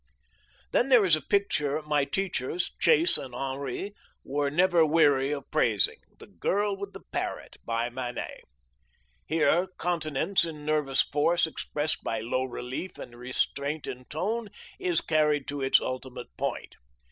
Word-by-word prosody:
Then 255 Hz, -, +2 dB
there 240 Hz, -6 st, +7 dB
is 170 Hz, -4 st, +5 dB
a 155 Hz, -, -4 dB
picture 150 Hz, -4 st, +1 dB
my 150 Hz, -2 st, +1 dB
teachers, 180 Hz, -3 st, -2 dB
Chase 365 Hz, -7 st, +4 dB
and 125 Hz, -2 st, -8 dB
Henri, 135 Hz, +8 st, -3 dB, 0.3 s
were 145 Hz, +1 st, 0 dB
never 175 Hz, +2 st, +4 dB
weary 145 Hz, -4 st, +4 dB
of 145 Hz, -2 st, -4 dB
praising, 115 Hz, -10 st, +2 dB, 0.2 s
the -, -, -12 dB
Girl 205 Hz, +1 st, 0 dB
with 200 Hz, 0 st, -7 dB
the -, -, -9 dB
Parrot, -, -, -4 dB
by 115 Hz, +1 st, 0 dB
Manet. 125 Hz, -1 st, -5 dB, 0.9 s
Here 165 Hz, +3 st, +3 dB
continence 170 Hz, +1 st, +1 dB
in 155 Hz, -3 st, -6 dB
nervous 150 Hz, -4 st, +2 dB
force, 165 Hz, +5 st, +2 dB
expressed 155 Hz, -1 st, -2 dB
by 115 Hz, -, -1 dB
low 125 Hz, +4 st, -1 dB
relief 130 Hz, +7 st, -5 dB
and 120 Hz, -, -9 dB
restraint 140 Hz, +4 st, -1 dB
in 125 Hz, 0 st, -6 dB
tone, 210 Hz, -, -2 dB, 0.3 s
is 175 Hz, -3 st, +2 dB
carried 150 Hz, -2 st, +2 dB
to 145 Hz, -1 st, -3 dB
its 135 Hz, 0 st, +5 dB
ultimate 130 Hz, 0 st, -6 dB
point. -, -, -4 dB
150 Hz, 145 wpm, -28 LUFS, 135-175 Hz, 0.9 s, there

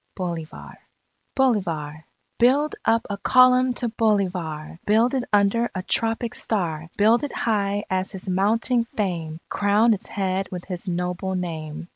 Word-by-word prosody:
_ -, -, -48 dB
BOLIVAR 170 Hz, -4 st, -6 dB, 0.6 s
BOLIVAR 165 Hz, -, 0 dB, 0.3 s
_Build 280 Hz, +5 st, +3 dB
up 230 Hz, 0 st, +2 dB
a 200 Hz, -1 st, -5 dB
Column 255 Hz, +2 st, +5 dB
to 245 Hz, -, -1 dB
Bolivar! 185 Hz, -9 st, -1 dB
Build 225 Hz, +5 st, +3 dB
it 260 Hz, -2 st, 0 dB
under 205 Hz, +3 st, +3 dB
a 185 Hz, -, -3 dB
tropic 225 Hz, +3 st, -1 dB
star! 165 Hz, -7 st, -2 dB
Build 225 Hz, +5 st, +4 dB
it 290 Hz, -, -3 dB
high 205 Hz, -2 st, 0 dB
as 185 Hz, +1 st, -1 dB
his 190 Hz, 0 st, -9 dB
mounting 225 Hz, +6 st, +1 dB
fame! 165 Hz, -6 st, -2 dB
Crown 210 Hz, +3 st, +3 dB
its 200 Hz, -, -4 dB
head 195 Hz, -1 st, -2 dB
with 180 Hz, -2 st, -6 dB
his 180 Hz, 0 st, -6 dB
noble 180 Hz, +1 st, -2 dB
name! 165 Hz, -3 st, -5 dB
200 Hz, 145 wpm, -23 LUFS, 180-230 Hz, 0.6 s, Column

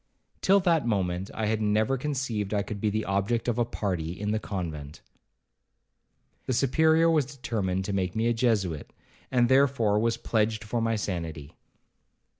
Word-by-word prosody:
Till 195 Hz, +1 st, +5 dB
that 165 Hz, -8 st, +2 dB
moment, 95 Hz, -3 st, -1 dB
I 110 Hz, -, -3 dB
had 110 Hz, +1 st, 0 dB
never 110 Hz, +4 st, +2 dB
conceived 125 Hz, -7 st, -2 dB
I 100 Hz, -, +1 dB
could 100 Hz, -1 st, -6 dB
be 105 Hz, -, +2 dB
the 110 Hz, +1 st, -2 dB
object 100 Hz, +5 st, 0 dB
of 120 Hz, 0 st, 0 dB
a 120 Hz, -, +3 dB
party 90 Hz, -7 st, -3 dB
in 105 Hz, 0 st, -2 dB
the 110 Hz, -, 0 dB
convent. 80 Hz, -9 st, -6 dB, 1.5 s
The 130 Hz, -, 0 dB
Superior 160 Hz, +6 st, +3 dB
was 155 Hz, -5 st, +2 dB
determined 105 Hz, -9 st, -2 dB
to 100 Hz, -, -3 dB
make 90 Hz, -2 st, -1 dB
me 110 Hz, +1 st, 0 dB
a 120 Hz, -, +3 dB
Jesuit, 105 Hz, -, 0 dB, 0.4 s
and 120 Hz, -2 st, +3 dB
therefore 130 Hz, -5 st, +3 dB
was 115 Hz, +1 st, +1 dB
pledged 110 Hz, -1 st, 0 dB
for 115 Hz, +2 st, -2 dB
my 115 Hz, 0 st, +1 dB
sanity. 85 Hz, -7 st, -4 dB
110 Hz, 165 wpm, -27 LUFS, 95-120 Hz, 1.5 s, Till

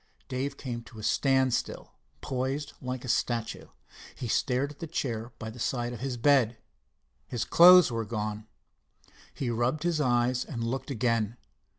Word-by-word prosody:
Dave 135 Hz, +2 st, -3 dB
came 120 Hz, -3 st, -5 dB
to 115 Hz, -, -14 dB
a 110 Hz, -, -8 dB
standstill, 130 Hz, 0 st, +1 dB, 0.3 s
posed 135 Hz, +3 st, -3 dB
like 125 Hz, -1 st, -4 dB
a -, -, -7 dB
statue. 120 Hz, -1 st, -1 dB, 0.5 s
He 125 Hz, -, -5 dB
stared 130 Hz, +4 st, 0 dB
at 145 Hz, -, -15 dB
the 165 Hz, -, -5 dB
chair 120 Hz, -7 st, -3 dB
by 110 Hz, -1 st, -6 dB
the 125 Hz, -, -12 dB
side 120 Hz, 0 st, -1 dB
of 120 Hz, -, -8 dB
the 130 Hz, -2 st, -3 dB
bed. 125 Hz, -3 st, +3 dB, 0.7 s
His 120 Hz, -2 st, -2 dB
clothes 180 Hz, -3 st, +8 dB
were 115 Hz, -1 st, -1 dB
gone! 105 Hz, -1 st, -4 dB, 0.8 s
He 125 Hz, -4 st, -3 dB
rubbed 120 Hz, +7 st, 0 dB
his 170 Hz, -3 st, +1 dB
eyes 125 Hz, -1 st, +2 dB
and 115 Hz, -5 st, -5 dB
looked 130 Hz, +4 st, -3 dB
again. 115 Hz, -3 st, 0 dB
125 Hz, 160 wpm, -28 LUFS, 115-135 Hz, 0.8 s, clothes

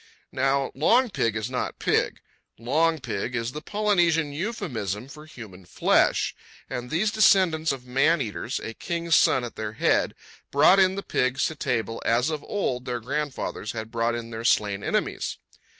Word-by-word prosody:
Now 135 Hz, +1 st, +1 dB
long 235 Hz, -, +3 dB
pig 115 Hz, -, 0 dB
is 110 Hz, 0 st, -2 dB
not 125 Hz, -, -3 dB
pig. -, -, 0 dB, 0.4 s
Long 160 Hz, +8 st, +1 dB
pig 125 Hz, -2 st, -4 dB
is 115 Hz, 0 st, -2 dB
the 150 Hz, -, -7 dB
Polynesian 175 Hz, -7 st, +1 dB
euphemism 135 Hz, -, -4 dB
for 150 Hz, +2 st, -12 dB
human 105 Hz, -10 st, -11 dB
flesh; 90 Hz, -, +2 dB, 0.3 s
and 125 Hz, -2 st, -5 dB
these 200 Hz, +9 st, +1 dB
descendants 180 Hz, -7 st, +4 dB
of 130 Hz, -2 st, -6 dB
man 140 Hz, +7 st, +2 dB
eaters, 120 Hz, 0 st, -3 dB
a 115 Hz, -, -5 dB
king's 170 Hz, +4 st, -1 dB
son 130 Hz, -, +4 dB
at 120 Hz, -, -7 dB
their 110 Hz, -1 st, -4 dB
head, -, -, +1 dB, 0.3 s
brought 165 Hz, +7 st, +5 dB
in 190 Hz, 0 st, +4 dB
the 200 Hz, -, -4 dB
pigs 130 Hz, +2 st, 0 dB
to 160 Hz, -, -2 dB
table 115 Hz, -5 st, -2 dB
as 120 Hz, +6 st, +2 dB
of 155 Hz, -2 st, -4 dB
old 130 Hz, -11 st, -2 dB
their 125 Hz, -1 st, -2 dB
grandfathers 135 Hz, -3 st, -4 dB
had 110 Hz, -1 st, -6 dB
brought 115 Hz, 0 st, 0 dB
in 115 Hz, 0 st, -6 dB
their 115 Hz, 0 st, -6 dB
slain 105 Hz, -4 st, +1 dB
enemies. -, -, -2 dB
135 Hz, 165 wpm, -25 LUFS, 115-160 Hz, 0.4 s, brought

